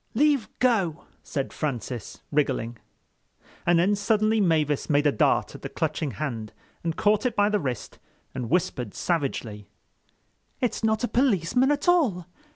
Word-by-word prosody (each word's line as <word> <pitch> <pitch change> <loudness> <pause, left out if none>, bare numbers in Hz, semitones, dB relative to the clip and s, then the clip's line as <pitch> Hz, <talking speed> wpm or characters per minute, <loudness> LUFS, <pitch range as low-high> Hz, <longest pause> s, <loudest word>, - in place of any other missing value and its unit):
"Leave 280 -4 +3
go," 195 -11 +1 0.2
said 140 -3 -4
Francis, 125 -6 -4
wriggling. 135 -5 0 0.9
And 175 0 +5
then 190 +5 +3
suddenly 215 +1 +2
Mavis 155 -6 +1
made 145 0 +3
a 145 - +5
dart 110 - +2
at - - -10
the - - -5
clutching 155 -3 -2
hand 115 -5 -4 0.3
and 165 -1 -1
caught 210 0 +3
it 250 -3 0
by 205 0 +3
the 210 -1 +1
wrist 130 - -5 0.3
and 125 -3 -4
whispered 125 - -1
savagely: 125 - -2 0.9
"It's 245 -2 -1
not 220 0 +1
a - - +2
policeman 250 - +2
at 290 +2 0
all. 265 - +3
170 Hz, 150 wpm, -26 LUFS, 140-220 Hz, 0.9 s, And